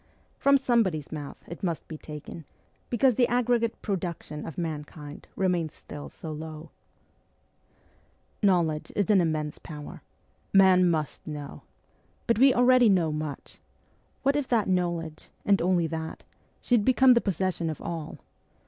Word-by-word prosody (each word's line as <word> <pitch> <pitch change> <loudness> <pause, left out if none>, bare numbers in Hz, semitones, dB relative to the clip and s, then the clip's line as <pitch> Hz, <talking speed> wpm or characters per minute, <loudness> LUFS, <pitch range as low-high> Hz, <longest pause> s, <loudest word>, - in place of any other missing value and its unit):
From 280 0 +5
somebody's 225 - +1
mouth 150 -3 -7
it 170 - -8
must 170 -4 -3
be 160 - -7
taken, 150 +1 -9 0.4
because 250 +2 +3
the 245 +2 +3
aggregate 240 -1 +1
production 175 -6 -4
of 160 - -8
mankind 150 -3 -6
remains 175 -5 0
still 145 - -9
so 160 - -8
low. 155 +1 -8 1.7
ST. - - -41
PETERSBURG 205 - +5
21 190 - +5
Knowledge 155 -1 -4
is 200 -1 0
an 195 -3 +5
immense 155 -3 -2
power. 150 -2 -9 0.5
Man 185 -2 +6
must 155 -3 -2
know. 150 -2 -7 0.6
But 230 -1 +1
we 270 +1 +7
already 250 -1 +5
know 175 -5 +3
much! 150 -2 -6 0.6
What 275 +1 +3
if 290 -3 0
that 230 -4 +2
knowledge 170 -4 -2 0.2
and 200 -1 +3
only 175 -1 +2
that 160 0 -5 0.4
should 240 -4 +3
become 260 +2 +6
the 235 - +3
posses 185 -1 -1
sion 165 -1 -2
of 155 - -5
all 165 -3 -5
175 Hz, 150 wpm, -27 LUFS, 155-225 Hz, 1.7 s, we